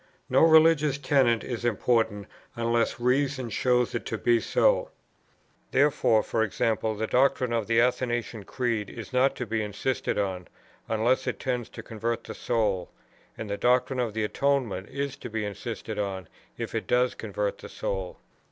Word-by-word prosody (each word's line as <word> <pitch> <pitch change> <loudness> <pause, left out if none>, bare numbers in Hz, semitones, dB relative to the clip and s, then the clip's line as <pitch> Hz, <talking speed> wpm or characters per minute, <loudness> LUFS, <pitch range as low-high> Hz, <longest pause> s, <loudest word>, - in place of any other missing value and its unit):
No 130 - +5
religious 160 -3 +5
tenet 130 -5 +2
is 120 -2 -5
important, 115 -2 +1 0.3
unless 115 0 0
reason 130 0 0
shows 125 0 +1
it - - -2
to 115 - -2
be 120 +1 +3
so. - - +2 0.8
Therefore, 135 -6 +3
e.g. 110 -2 -2
the 110 -1 0
doctrine 125 -1 +2
of 115 -3 -1
the 115 0 +3
Athanasian 120 -3 0
Creed 115 -5 -2
is 115 +1 -9
not 130 +2 +3
to 125 - -4
be 110 0 -1
insisted 105 +5 -2
on, 95 -3 -2 0.4
unless 115 +3 +1
it - - -2
tends 125 -3 -2
to - - -9
convert 115 +1 -3
the - - -7
soul; 105 -7 -1 0.5
and 110 - -5
the 100 0 -3
doctrine 125 +2 +2
of 115 -4 -1
the 110 - 0
Atonement 115 -5 0
is 140 -1 -3
to 140 - -8
be 110 -1 -2
insisted 105 +1 -5
on, 95 -2 -3 0.3
if - - -5
it - - -3
does 125 0 +2
convert 105 -2 -3
the - - -10
soul. 95 -2 -4
115 Hz, 160 wpm, -27 LUFS, 110-125 Hz, 0.8 s, No